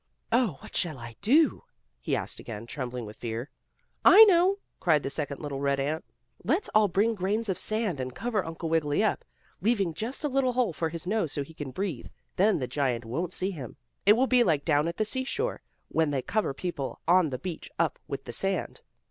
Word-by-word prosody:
"Oh, 225 - +2
what - - -12
shall 160 -6 -1
I 115 -2 -9
do?" 285 +9 +4 0.4
he - - -1
asked - - -3
again, 110 -1 -7
trembling 125 -2 -5
with 105 0 -10
fear. 115 +3 -5 0.5
"I 430 +3 +10
know!" 380 -1 +5 0.2
cried 155 -5 +3
the 135 - -3
second 145 -2 -3
little 145 -3 -4
red 140 0 +1
ant. 150 +4 -1 0.4
"Let's - - 0
all 215 -1 +4
bring 205 +5 +2
grains 205 +3 -1
of 190 - 0
sand, 215 -8 0
and 130 -1 -4
cover 230 -5 -1
Uncle 165 +1 -5
Wiggily 160 +2 +1
up, 215 - 0 0.4
leaving 200 -5 +1
just 235 - -4
a - - +2
little 265 -2 +1
hole 240 -7 +1
for 160 +2 -1
his 165 0 -7
nose, 195 -5 0
so 145 - -2
he 160 - -13
can 150 -3 -6
breathe. 185 -2 -4 0.3
Then 205 +3 +3
the 130 - -2
giant 125 -3 -1
won't 160 +10 -3
see 185 +2 -1
him. 135 - -8 0.3
It 205 - +7
will 250 +4 +3
be 250 -2 +4
like 150 -9 +1
down 150 -1 +3
at 170 - -4
the 215 - +1
seashore, 275 - -2 0.3
when 160 -2 +2
they 135 -3 -1
cover 215 -7 0
people 145 -5 -4
on 175 -2 +5
the 130 - -3
beach 175 +3 -6
up - - 0
with - - -5
the - - -7
sand." - - -1
170 Hz, 210 wpm, -28 LUFS, 140-220 Hz, 0.5 s, I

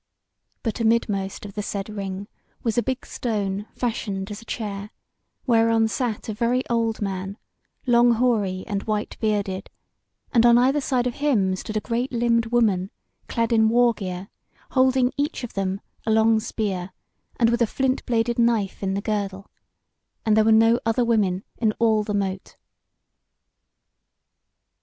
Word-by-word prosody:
But 225 -1 -2
amidmost 210 -4 0
of 200 - -8
the 210 - -3
said 200 -1 -4
Ring 200 -2 -5 0.4
was 225 -3 0
a 240 - +3
big 260 +1 -3
stone, 205 -3 -3
fashioned 210 -4 -3
as 210 +1 -7
a - - -15
chair, 205 -3 -5 0.6
whereon 225 -2 +3
sat 230 -2 -2
a 220 - -2
very 240 +4 0
old 225 -2 0
man, 195 0 -4 0.5
long 240 -1 +5
hoary 215 -6 +1
and 200 -2 -2
white 215 -1 -2
bearded, 200 -3 -1 0.6
and 230 -3 +5
on 240 0 +7
either 265 +4 +3
side 255 -2 0
of 250 - -1
him 225 -11 +1
stood 215 +3 -4
a - - -1
great 240 +4 -2
limbed 230 -1 +2
woman 215 -6 +2 0.4
clad 230 0 0
in 220 -1 +4
war 240 +1 +4
gear, 185 -2 -6 0.4
holding, 260 -1 +3
each 290 -1 -2
of 245 - -6
them, 195 0 -2 0.2
a - - -3
long 220 0 +4
spear, 195 -4 -3 0.5
and 230 -1 +4
with 235 0 0
a 235 - +4
flint 265 +3 0
bladed 235 0 +1
knife 230 -5 +1
in 195 -1 -1
the 200 - -1
girdle; 200 -2 -3 0.7
and 215 -1 +4
there 215 0 +4
were 225 - +4
no 225 +2 +5
other 230 +2 +1
women 200 -5 +1 0.2
in 220 -2 +2
all 220 -1 +2
the 210 0 -2
Mote. 190 -1 -3
220 Hz, 160 wpm, -24 LUFS, 200-235 Hz, 0.7 s, on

